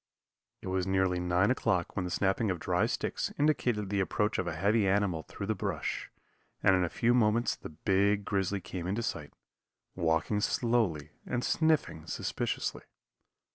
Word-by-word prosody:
It -, -, -6 dB
was 95 Hz, 0 st, 0 dB
nearly 95 Hz, -1 st, +2 dB
9 90 Hz, +5 st, +2 dB
o'clock 105 Hz, -9 st, 0 dB
when 95 Hz, -, -1 dB
the -, -, -3 dB
snapping 100 Hz, +4 st, +1 dB
of 90 Hz, -2 st, -1 dB
dry 90 Hz, +6 st, +1 dB
sticks -, -, -2 dB
indicated 120 Hz, -9 st, +1 dB
the 100 Hz, -, +1 dB
approach 105 Hz, +2 st, 0 dB
of -, -, -1 dB
a -, -, -2 dB
heavy 100 Hz, +2 st, +2 dB
animal 95 Hz, -4 st, +1 dB
through 100 Hz, -, -7 dB
the 110 Hz, -, 0 dB
brush, -, -, -3 dB, 0.5 s
and 95 Hz, -, +6 dB
in 90 Hz, -, +2 dB
a 90 Hz, -, 0 dB
few 120 Hz, +7 st, +2 dB
moments 115 Hz, 0 st, +2 dB
the -, -, -9 dB
big 100 Hz, +5 st, +1 dB
grizzly 100 Hz, 0 st, -1 dB
came 90 Hz, 0 st, -5 dB
into 105 Hz, +5 st, -1 dB
sight, -, -, -4 dB, 0.6 s
walking 85 Hz, +4 st, +1 dB
slowly 110 Hz, -, 0 dB, 0.2 s
and 125 Hz, -, -1 dB
sniffing 155 Hz, -, +1 dB
suspiciously. -, -, -2 dB
100 Hz, 165 wpm, -30 LUFS, 90-110 Hz, 0.6 s, and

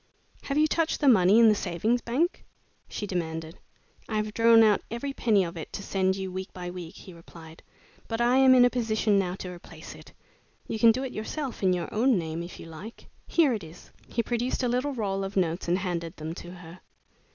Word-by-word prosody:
"Have 275 Hz, -, -2 dB
you 305 Hz, -, +5 dB
touched 325 Hz, +1 st, 0 dB
the 290 Hz, -, +1 dB
money 205 Hz, -4 st, +6 dB
in 230 Hz, -1 st, +7 dB
the 215 Hz, -, +6 dB
Savings 210 Hz, +5 st, -1 dB
Bank?" 290 Hz, +11 st, -1 dB, 0.5 s
she 210 Hz, -, -4 dB
demanded. 165 Hz, -3 st, -4 dB, 0.5 s
"I 220 Hz, -, -3 dB
have 215 Hz, 0 st, -2 dB
drawn 230 Hz, 0 st, +6 dB
out 210 Hz, -2 st, +4 dB
every 255 Hz, +5 st, -4 dB
penny 215 Hz, -7 st, +2 dB
of 170 Hz, -1 st, -6 dB
it 160 Hz, -, -7 dB
to 200 Hz, -, -5 dB
send 190 Hz, -1 st, 0 dB
you 190 Hz, -1 st, -5 dB
week 190 Hz, +1 st, -6 dB
by 180 Hz, -1 st, -6 dB
week," 180 Hz, 0 st, -8 dB
he 185 Hz, -, -12 dB
replied, 165 Hz, -1 st, -14 dB, 0.5 s
"but 225 Hz, 0 st, -3 dB
I 240 Hz, +2 st, +3 dB
am 265 Hz, -1 st, +6 dB
in 245 Hz, -1 st, +7 dB
a 245 Hz, -, +3 dB
position 220 Hz, -4 st, +1 dB
now 180 Hz, -2 st, -2 dB
to 185 Hz, -1 st, -7 dB
replace 175 Hz, -1 st, -11 dB
it. -, -, -14 dB, 0.6 s
You 220 Hz, -, -4 dB
can 230 Hz, 0 st, +7 dB
do 255 Hz, +4 st, -2 dB
it 260 Hz, -, -5 dB
yourself, 255 Hz, +5 st, -5 dB
in 190 Hz, -2 st, +3 dB
your 180 Hz, -1 st, -2 dB
own 240 Hz, +1 st, +3 dB
name, 165 Hz, -1 st, -4 dB
if 170 Hz, +1 st, -9 dB
you -, -, -9 dB
like. 165 Hz, +8 st, -11 dB, 0.2 s
Here 310 Hz, -7 st, +3 dB
it 215 Hz, -, -4 dB
is." 160 Hz, +2 st, -13 dB, 0.2 s
He 235 Hz, -, -1 dB
produced 245 Hz, +2 st, -2 dB
a -, -, +2 dB
little 250 Hz, +4 st, 0 dB
roll 195 Hz, -4 st, -2 dB
of 195 Hz, +1 st, -5 dB
notes 175 Hz, -1 st, 0 dB
and 175 Hz, +1 st, +2 dB
handed 175 Hz, -3 st, -4 dB
them 155 Hz, +1 st, -6 dB
to 175 Hz, -, -9 dB
her. 175 Hz, -1 st, -12 dB
200 Hz, 220 wpm, -27 LUFS, 175-235 Hz, 0.6 s, in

